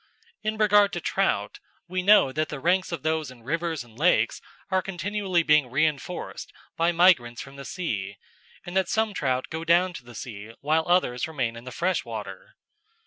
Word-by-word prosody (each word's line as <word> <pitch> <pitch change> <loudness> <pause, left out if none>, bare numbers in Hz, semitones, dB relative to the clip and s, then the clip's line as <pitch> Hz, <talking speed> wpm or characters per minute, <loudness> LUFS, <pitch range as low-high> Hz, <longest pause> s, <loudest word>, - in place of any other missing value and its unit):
In 215 0 -2
regard 205 -1 +4
to - - -2
trout, - - -1 0.3
we 185 +1 -2
know 195 -8 +6
that 155 +3 -1
the 150 - -5
ranks 180 +6 +1
of 170 - -4
those 155 -2 0
in 125 -2 -14
rivers 165 +1 -2
and 115 -2 -19
lakes 180 +4 +2 0.3
are 190 0 +3
continually 190 0 -1
being 150 -4 +4
reinforced 155 +5 -2 0.2
by 170 +1 +2
migrants 165 -10 +4
from 135 0 -9
the 140 0 -9
sea, 100 - -4 0.5
and 175 - -7
that 190 -2 +2
some 220 +2 +1
trout 130 -7 -1
go 160 +1 -4
down 175 +2 +3
to 135 - -9
the 120 0 -13
sea 110 -1 -8
while 155 +2 +1
others 175 -9 +2
remain 130 -7 -2
in 115 +1 -10
the 130 - -7
freshwater. 185 +5 -3
160 Hz, 180 wpm, -26 LUFS, 130-185 Hz, 0.5 s, know